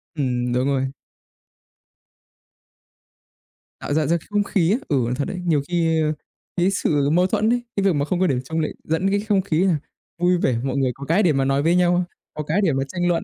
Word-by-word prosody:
Ừm, 125 -4 -1
đúng 125 +1 +1
rồi. 135 -1 +1 2.9
Tạo 145 - -3
ra 155 -1 +2
ra 170 +2 +2
không 205 0 +1
khí 185 -4 +1
á. 220 - +3
Ừ, 145 - +1
nó 120 - -1
thật 140 +1 -2
đấy, 180 -2 -5
nhiều 155 -5 +2
khi, 165 -2 +1
ơ, 155 0 +1 0.5
cái 180 +2 +3
sự 145 -7 +1
mâu 180 +4 +3
thuẫn 215 +3 +1
ấy, 245 0 +1
cái 200 - 0
việc 195 -3 +3
mà 145 0 0
không 175 +2 -1
có 185 - +3
điểm 130 -6 +1
chung 160 - -1
lại 155 - -1
dẫn 165 +5 0
cái 200 +1 +1
không 205 -2 +1
khí 175 -2 0
là 185 -4 +3 0.4
vui 180 +1 +2
vẻ, 125 -8 +1
mọi 135 0 -2
người 130 -2 +1
có 140 - -8
cái 180 +8 +2
để 165 - +3
mà 135 -1 +1
nói 135 +1 +1
với 165 +2 +3
nhau, 180 0 +3 0.3
có 150 - -4
cái 160 +8 0
để 160 -7 +2
mà 135 - 0
tranh 175 -1 -1
luận. 175 -1 +1
165 Hz, 230 wpm, -22 LUFS, 140-180 Hz, 2.9 s, á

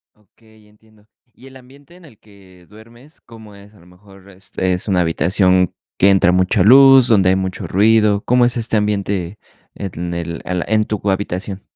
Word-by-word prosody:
Okey, 110 +1 -26
ya 105 - -24
entiendo. 105 0 -27 0.3
¿Y 130 - -18
el 130 - -17
ambiente 135 +5 -19
en 180 - -19
el 115 -8 -20
que 95 -4 -21
duermes 120 - -19
cómo 110 -3 -16
es? 100 +1 -18
A - - -21
lo 85 - -22
mejor, 95 +2 -20
este, 95 -1 -3
es 90 +4 -5
una 90 -2 +1
habitación 90 +2 0 0.2
que 100 - +3
entra 95 -2 +3
mucha 95 +2 +1
luz, 135 +3 +6
donde 100 -5 +2
hay 95 - +2
mucho 95 -1 -5
ruido, 105 0 +2
¿cómo 125 0 +2
es 120 0 -2
este 115 -1 -2
ambiente 100 -2 -3 0.4
en 85 -3 -7
el 85 -1 -6
el 90 -1 -4
en 110 -1 +1
tu 105 -1 -5
cu 100 - -2
habitación? 95 0 -5
100 Hz, 195 wpm, -16 LUFS, 95-110 Hz, 0.4 s, luz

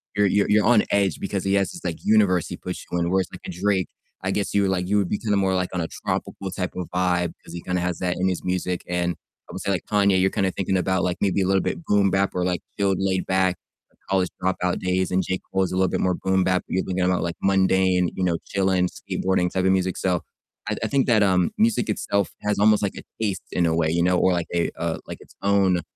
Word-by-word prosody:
you're 105 -1 +3
you're 100 +1 +2
you're 105 0 +4
on 115 -4 +5
edge 100 -5 +1
because - - -3
he 95 0 0
has 100 -1 +1
this, 175 - -10
like, 85 - -3
universe 100 -5 +3
he - - -6
puts - - -6
you 90 - 0
in. 85 0 0
Whereas 95 -1 +1
like - - -9
a - - -4
Drake, 95 +1 0 0.4
I 95 - 0
guess 100 - -2
you 100 -1 +3
would 95 - +1
like, 90 -1 -1
you 105 +1 +2
would 100 -3 +1
be 105 - -1
kinda 105 -3 0
more 95 -1 +2
like 90 -1 0
on 90 - -1
a 80 - -2
tropical 95 -1 -4
type 90 -1 -4
of 90 -2 -4
vibe 90 -1 +1
'cause - - -12
he 85 - -6
kinda 90 -1 -2
has 90 -1 -2
that 90 -1 -1
in 95 - +2
his 90 -2 -2
music, 90 -1 -2
and, 90 0 -1 0.3
I - - -9
would - - -5
say 100 - -3
like 90 - -2
Kanye, 100 -2 +3
you're 95 +1 +3
kinda 95 -1 +1
thinking 95 0 -1
about 95 0 0
like 90 -1 -1
maybe 100 -1 +2
a - - +1
little 95 -1 +3
bit 170 - -3
boom 100 -1 +3
bap 95 0 +1
or 90 - 0
like 90 -2 -1 0.2
chilled, 95 -2 +2
laid 95 -1 0
back, 95 -1 +2 0.5
college 95 -2 +1
dropout 90 -1 0
days. 90 0 0
And 95 +1 +2
J. 95 0 -2
Cole 95 - +1
is 90 - -2
a - - -2
little 95 0 +3
bit - - -1
more 90 -1 +1
boom 95 -1 +1
bap, 90 0 +1
but - - -6
you're 95 - +1
thinking 95 0 -1
about 90 -2 +1
like 85 0 -3
mundane, 95 -2 +3
you 95 - -2
know, 85 -2 +1
chilling, 95 -2 +1
skateboarding 90 -2 -1
type 95 0 0
of 95 - +4
music, 95 -1 0
so 90 -2 0 0.5
I - - 0
I - - +1
think 135 -2 +2
that, 110 -3 +4
um, 90 -2 +2
music 225 - +2
itself 100 -2 0
has 105 -1 0
almost 105 0 +5
like 100 - -1
a - - -8 0.2
taste 95 -3 -2
in 85 - +2
a 80 - +1
way, 80 -1 +1
you 85 +1 +1
know, 90 0 +3
or 95 0 +3
like 85 -1 -1
a, 85 -1 +1
uh, 85 -1 -1
like - - -7
its - - -17
own, 95 -3 +3
95 Hz, 270 wpm, -23 LUFS, 90-100 Hz, 0.5 s, on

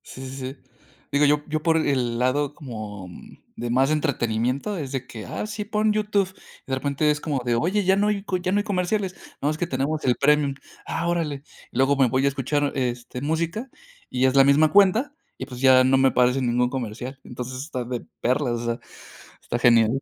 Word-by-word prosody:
Sí, 130 - -10
sí, 130 - -8 0.2
sí, - - -24 0.5
digo, 145 +1 +4
yo 145 0 +3
yo 155 0 -2
por 160 +1 +3
el 130 -6 0
lado 140 +4 0
como 110 -8 -7 0.5
de 120 - -4
más 130 +4 +3
entretenimiento 135 - 0
es 140 -5 -5
de 135 -2 -3
que: 110 -3 -9
"Ah, - - -4
sí, 210 0 -4
pon 210 0 +1
YouTube", 210 -2 +1 0.4
y - - -18
de - - +2
repente 140 +3 0
es 150 0 -2
como 145 -5 -2
de: 120 -1 +2
"Oye, 185 - +1
ya 190 +1 +4
no 205 +1 +2
hay 205 -2 0
co 190 -2 -1
ya 180 +1 -2
no 200 - +2
hay 205 - +1
comerciales", 190 -1 -1 0.3
"No, 145 - +1
es 155 - -4
que 175 - -1
tenemos 145 +2 -2
el 125 -2 +3
premium", 145 +1 +2 0.3
"Ah, 170 - -2
órale", 155 -5 -1 0.3
luego 135 +3 +2
me 135 -2 +5
voy 130 +3 +1
a - - +4
escuchar, 140 +1 -1
este, 125 -1 -3
música 165 - -2 0.4
y 125 +1 +1
es 130 +1 +2
la 135 - +8
misma 145 +3 +4
cuenta 205 +9 +4 0.2
y 130 - -5
pues 125 -2 -9
ya 130 -1 +7
no 130 +1 +4
me 135 0 +5
aparece 125 +1 +2
ningún 125 0 +1
comercial, 125 +1 -5
entonces 125 +1 -6
está 130 -4 -4
de 120 0 -5 0.2
perlas, 125 0 +1
o - - -5
sea, 115 +1 -2 0.6
está 120 - -3
genial. 120 +1 +4
140 Hz, 215 wpm, -24 LUFS, 125-165 Hz, 0.6 s, la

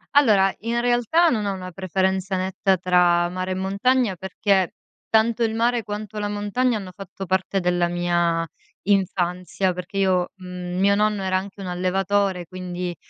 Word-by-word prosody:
Allora, 205 -9 +5
in 230 +2 -1
realtà 245 +8 +3
non 215 -6 0
ho 200 - -1
una 185 -1 -7
preferenza 190 +1 -1
netta 190 +1 +1
tra 175 -1 +3
mare 185 +1 -4
e - - +1
montagna 200 +4 +1
perché 190 0 0 0.4
tanto 225 +1 +3
il 225 -1 0
mare 235 +1 +1
quanto 210 +1 -6
la 205 0 -1
montagna 210 +4 0
hanno 190 -3 -7
fatto 195 0 -8
parte 190 +1 0
della 175 -1 +1
mia 175 -1 0 0.4
infanzia, 185 -1 0
perché 180 +2 -7
io 185 -2 +2
mhmm, 180 -1 -6
mio 200 +1 +4
nonno 210 -1 +1
era 185 0 0
anche 195 +1 -7
un 190 - -6
allevatore, 185 +1 0
quindi 180 -1 -5
190 Hz, 160 wpm, -23 LUFS, 180-205 Hz, 0.4 s, Allora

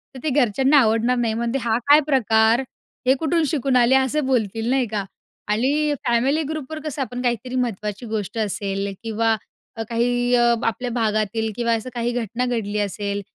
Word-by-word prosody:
तर - - -7
ते 310 - 0
घरच्यांना 270 +1 +3
आवडणार 230 +1 +2
नाही 230 -2 0
म्हणतील, 235 +3 -2
"हा 230 -1 +1
काय 295 +1 +8
प्रकार? 225 -3 +3 0.5
हे 260 - +6
कुठून 325 +1 +1
शिकून 275 -3 0
आले?" 245 +2 +4
असं 265 +2 +1
बोलतील, 225 -3 0
नाही 260 -1 +2
का? 205 -2 -1 0.4
आणि 280 +8 +1
फॅमिली 265 +7 +2
ग्रुपवर 310 0 -5
कसं 295 -2 -4
आपण 250 -1 -4
काहीतरी 245 +1 -2
महत्त्वाची 215 -2 -3
गोष्ट 210 0 -3
असेल 200 -2 -2
किंवा 225 0 +1 0.4
अ, 225 - -2
काही 245 +1 +1
अ, 240 -1 +4
आपल्या 245 +2 -1
भागातील 220 -1 0
किंवा 235 -1 0
असं 225 +3 -5
काही 240 0 -1
घटना 240 +1 -2
घडली 215 -4 -2
असेल 205 0 -2
235 Hz, 170 wpm, -22 LUFS, 220-260 Hz, 0.5 s, काय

